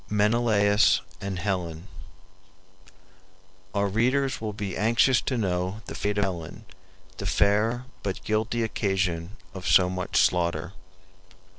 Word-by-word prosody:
MENELAUS 105 -1 +3 0.2
AND 100 -2 -4
HELEN 90 -3 -3 1.9
Our 100 0 +2
readers 125 +5 +1
will 110 -1 -3
be 100 -3 -5
anxious 115 +4 +3
to 130 - -2
know 95 0 -1
the - - -7
fate 105 0 -2
of 100 - +3
Helen, 95 +3 -5 0.5
the 100 - -4
fair 110 +6 +2 0.2
but 95 -2 -4
guilty 110 +2 0
occasion 95 -3 -1 0.2
of 95 -2 -6
so 90 -1 +5
much 90 0 -2
slaughter. 85 0 +1
100 Hz, 120 wpm, -26 LUFS, 90-110 Hz, 1.9 s, so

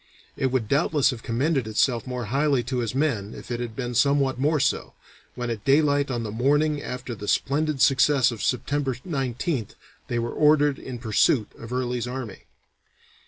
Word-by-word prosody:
It 135 - 0
would 130 -4 -1
doubtless 145 +2 +2
have 120 -3 -7
commended 130 +2 0
itself 115 +3 +1
more 125 -1 -4
highly 140 -3 +2
to 125 +1 -2
his 120 0 -2
men 120 -8 -1
if - - -10
it 120 - -2
had 120 -2 -5
been 125 -2 -3
somewhat 135 +1 +2
more 150 +3 +2
so, 135 - -1 0.4
when 120 -1 -3
at 110 -3 -5
daylight 145 0 +3
on 120 -3 -2
the 105 - -4
morning 145 +6 +1
after 125 -1 -5
the 105 -2 -8
splendid 150 +4 0
success 135 -1 +4
of 115 - -7
September 135 +1 -1
19th 130 - -3 0.3
they 120 - -2
were 120 0 -2
ordered 150 -2 +3
in 130 -2 -7
pursuit 110 0 +2
of 115 +1 -10
Early's 125 -1 -2
army. 125 -3 -6
130 Hz, 175 wpm, -25 LUFS, 120-145 Hz, 0.4 s, success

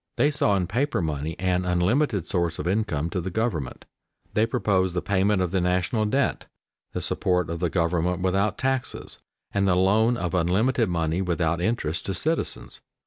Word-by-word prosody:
They 145 - +3
saw 140 -9 +2
in 95 -2 +1
paper 125 - 0
money 80 -1 -3
an 90 0 0
unlimited 95 - +1
source 85 -2 -1
of - - -4
income 90 -6 0
to 90 - -1
the 95 - -4
government. 90 - -2 0.5
They 110 +2 +2
proposed 95 -6 +1
the 90 - 0
payment 100 0 +2
of 90 - -2
the 95 -1 +1
national 90 +5 +1
debt, 135 +5 0 0.5
the - - -3
support 90 -2 0
of 85 - -4
the 90 0 0
government 85 +1 0
without 95 +2 +1
taxes, 135 -1 -2 0.3
and 100 0 +1
the 90 - +3
loan 110 +6 +3
of 85 -6 -3
unlimited 100 +7 +2
money 85 0 0
without 85 -2 0
interest 85 -6 -1
to 95 - -1
citizens. 160 - -2
95 Hz, 175 wpm, -25 LUFS, 85-110 Hz, 0.5 s, They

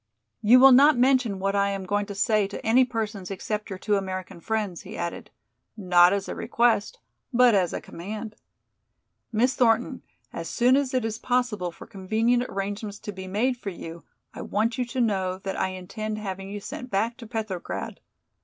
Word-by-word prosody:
"You 235 +4 +7
will 270 +1 +9
not 280 +2 +7
mention 255 -5 +3
what 195 +1 -1
I 200 0 +2
am 195 -1 -4
going 205 +2 -1
to 200 - -6
say 210 0 +2
to 200 - -8
any 240 +4 +5
persons 220 -6 -4
except 210 +2 -4
your 190 - -5
two 205 +2 +1
American 185 -2 -5
friends," 210 -5 -2
he - - -9
added, 170 0 -5 0.5
not 180 -3 +5
as 200 -1 -1
a - - -4
request, 230 -3 +1 0.3
but 245 -1 +5
as 185 -4 +2
a - - -3
command. 210 +5 -7 1.0
"Miss 240 +4 +2
Thornton, 230 -4 +2 0.3
as - - -5
soon 250 +1 +3
as 270 -2 0
it 250 -3 +1
is 225 0 -3
possible 240 -8 0
for - - -12
convenient 225 +6 0
arrangements 200 +1 -4
to 210 - -7
be 190 -1 -8
made 240 +7 0
for 210 - -5
you 170 -2 -9 0.3
I - - -7
want 225 +3 0
you 250 - +1
to 255 +2 -5
know 190 -5 0
that 195 0 -5
I - - 0
intend 195 +4 -5
having 195 -2 -5
you 205 0 -6
sent 250 +4 -7
back 220 +4 0
to 235 -4 -10
Petrograd. 215 -6 -5
210 Hz, 190 wpm, -25 LUFS, 195-235 Hz, 1.0 s, will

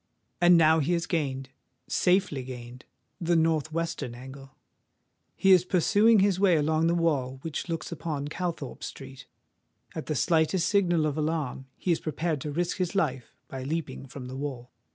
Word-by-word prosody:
And 175 0 +7
now 160 0 +5
he 155 +4 +1
has 170 0 0
gained—safely 145 +3 -1
gained—the 125 +6 -6
north 160 -1 +1
western 165 -7 -3
angle: 135 +2 -11 0.8
he 195 - +3
is 180 -2 +7
pursuing 205 +5 +4
his 195 -2 +2
way 190 -3 +4
along 155 +2 +2
the 170 - +2
wall 140 -6 0
which 165 +2 -4
looks 165 +1 -4
upon 150 -3 -4
Calthorpe 165 -4 -5
Street. 135 -1 -9 0.7
At 160 - -6
the 155 - -1
slightest 165 +4 +2
signal 175 -6 +2
of 155 0 -1
alarm 150 -4 -2
he 180 - -1
is 165 - +2
prepared 155 -1 -2
to 150 - -4
risk 175 +4 -1
his 185 0 -2
life 135 -10 -1 0.2
by 130 - -6
leaping 150 0 -4
from 130 0 -9
the 130 +1 -7
wall. 135 -3 -5
160 Hz, 160 wpm, -27 LUFS, 135-170 Hz, 0.8 s, And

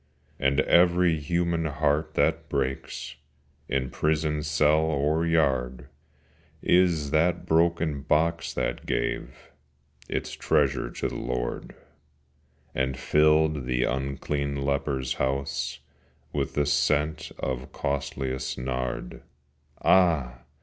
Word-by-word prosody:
And 70 +2 +2
every 85 -1 +4
human 85 +1 0
heart 75 0 0
that 80 -1 +1
breaks, 70 +1 -3 0.5
In 65 -2 -1
prison 75 -1 0
cell 75 0 +3
or 80 +1 +1
yard, 65 -5 0 0.7
Is 90 0 +4
as 75 -3 -4
that 80 +3 +2
broken 80 -3 +1
box 80 +3 +1
that - - -2
gave 65 - -3 0.6
Its - - -3
treasure 70 -4 +1
to - - -3
the - - -7
Lord, - - -4 1.0
And 65 0 -1
filled 75 -1 +3
the 60 0 +1
unclean 70 +2 -2
leper's 70 -2 -1
house 70 +1 -1 0.6
With - - -2
the 75 - +2
scent 75 +1 +1
of 65 0 -4
costliest 65 -2 -3
nard. 65 0 -4 0.6
Ah! 80 -10 +3
75 Hz, 105 wpm, -26 LUFS, 65-80 Hz, 1.0 s, every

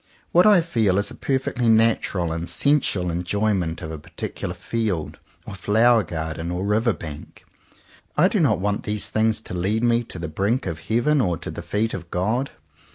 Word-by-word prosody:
What 180 +4 +6
I 205 -4 +6
feel 110 - +1
is 100 - +1
a - - -8
perfectly 130 -3 -1
natural 110 -6 +2
and 85 +1 -3
sensual 125 -11 +2
enjoyment 90 -1 -1
of 80 - -5
a 80 - -6
particular 85 +3 -6
field, 90 -1 -3 0.3
or - - -7
flower 110 +5 +3
garden, 80 -1 -4
or 90 +2 -2
river 110 +3 +2
bank, 75 -7 -9 0.7
I - - +6
do - - 0
not - - +3
want 100 +1 -1
these 105 -1 -1
things 110 0 +1
to - - -9
lead 100 +6 0
me 120 0 +3
to 90 - -9
the 85 0 -4
brink 100 +10 -1
of 80 -3 -4
Heaven 120 - +1
or 90 -7 0
to 85 - -6
the - - -6
feet 110 +2 -1
of 85 -2 -6
God. 110 +11 -1
105 Hz, 185 wpm, -23 LUFS, 85-115 Hz, 0.7 s, What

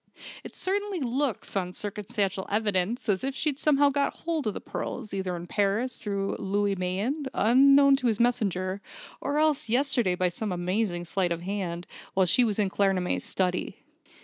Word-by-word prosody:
It - - -9
certainly 400 0 -1
looks, 260 -4 -2
on 180 -2 -1
circumstantial 205 -1 -3
evidence, 205 +2 0
as 200 +2 +1
if 270 0 -2
she'd 290 -1 -1
somehow 285 -2 +4
got 280 0 -1
hold 325 -6 -1
of 210 - -1
the - - -3
pearls, 220 -5 -5
either 190 -2 -2
in 170 0 -6
Paris, 205 +7 0
through 200 -2 -2
Louis 200 +1 0
Mayen, 200 +11 -2
unknown 275 +4 +6
to 255 -2 0
his 220 -3 +1
messenger; 200 -6 0 0.4
or 285 +1 -1
else, 305 -6 +2
yesterday 245 -6 +2
by 180 0 +1
some 205 +4 -4
amazing 180 0 -1
sleight 180 0 0
of 170 0 -2
hand, 180 -2 -3 0.3
while 190 -1 +4
she 245 +8 +4
was 215 -4 0
in 200 -3 +1
Claremanagh's 195 -3 +1
study. 180 -1 -2
205 Hz, 170 wpm, -27 LUFS, 185-265 Hz, 0.4 s, unknown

